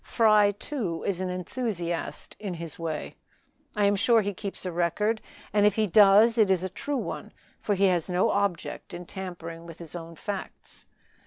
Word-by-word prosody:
Fry, 215 Hz, -3 st, +4 dB
too, 200 Hz, -, -4 dB
is 190 Hz, -2 st, -1 dB
an 185 Hz, -, -2 dB
enthusiast 180 Hz, -2 st, -3 dB
in 200 Hz, -4 st, -4 dB
his 165 Hz, -1 st, -6 dB
way. 160 Hz, -2 st, -4 dB, 0.6 s
I 205 Hz, -1 st, +2 dB
am 200 Hz, 0 st, +4 dB
sure 225 Hz, +3 st, +4 dB
he 205 Hz, 0 st, -2 dB
keeps 195 Hz, 0 st, -6 dB
a 180 Hz, -, -2 dB
record, 210 Hz, +6 st, 0 dB, 0.3 s
and 205 Hz, -1 st, +4 dB
if 205 Hz, -1 st, +4 dB
he 220 Hz, -, +2 dB
does 210 Hz, +4 st, +6 dB
it 210 Hz, -3 st, +5 dB
is 185 Hz, -2 st, +2 dB
a 190 Hz, -, -2 dB
true 280 Hz, +9 st, -3 dB
one, -, -, -5 dB, 0.3 s
for 205 Hz, -, 0 dB
he 195 Hz, +1 st, +3 dB
has 180 Hz, -2 st, +2 dB
no 180 Hz, +1 st, +2 dB
object 200 Hz, -4 st, -2 dB
in 175 Hz, +1 st, -7 dB
tampering 170 Hz, -3 st, -7 dB
with 165 Hz, -1 st, -10 dB
his 170 Hz, 0 st, -8 dB
own 165 Hz, -1 st, -7 dB
facts. 200 Hz, +4 st, -7 dB
190 Hz, 185 wpm, -27 LUFS, 175-210 Hz, 0.6 s, does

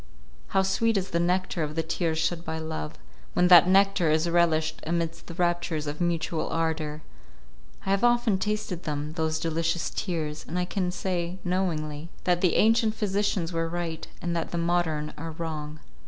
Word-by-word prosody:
How 195 Hz, 0 st, +2 dB
sweet 210 Hz, +3 st, +2 dB
is 190 Hz, 0 st, -2 dB
the 170 Hz, -, +1 dB
nectar 180 Hz, 0 st, 0 dB
of 155 Hz, 0 st, -3 dB
the 165 Hz, -, 0 dB
tears 160 Hz, 0 st, -1 dB
shed 165 Hz, +1 st, 0 dB
by 160 Hz, -1 st, -4 dB
love, 160 Hz, -, -4 dB, 0.4 s
when 180 Hz, 0 st, +3 dB
that 175 Hz, -1 st, +9 dB
nectar 195 Hz, -3 st, +4 dB
is 155 Hz, +2 st, +2 dB
relished 170 Hz, -2 st, +2 dB
amidst 165 Hz, 0 st, -2 dB
the 170 Hz, -, -8 dB
raptures 175 Hz, -3 st, 0 dB
of 150 Hz, +3 st, -4 dB
mutual 170 Hz, -1 st, 0 dB
ardour! 160 Hz, -2 st, -2 dB, 0.8 s
I 195 Hz, -, 0 dB
have 195 Hz, +2 st, +2 dB
often 240 Hz, -5 st, +3 dB
tasted 210 Hz, -4 st, -2 dB
them 150 Hz, -1 st, -3 dB
those 160 Hz, -1 st, -1 dB
delicious 165 Hz, +1 st, -1 dB
tears, 155 Hz, -5 st, -3 dB
and 175 Hz, -, -3 dB
I 180 Hz, -, +1 dB
can 185 Hz, 0 st, -1 dB
say 180 Hz, -1 st, -2 dB
knowingly 165 Hz, -4 st, -2 dB
that 180 Hz, -1 st, +2 dB
the 180 Hz, -, +3 dB
ancient 225 Hz, 0 st, +4 dB
physicians 200 Hz, -4 st, 0 dB
were 165 Hz, 0 st, -1 dB
right, 170 Hz, -2 st, -4 dB, 0.2 s
and 170 Hz, 0 st, -1 dB
that 165 Hz, -, -2 dB
the 170 Hz, -, -3 dB
modern 170 Hz, -3 st, 0 dB
are 165 Hz, +1 st, -5 dB
wrong. 155 Hz, -2 st, -5 dB
170 Hz, 175 wpm, -27 LUFS, 160-185 Hz, 0.8 s, that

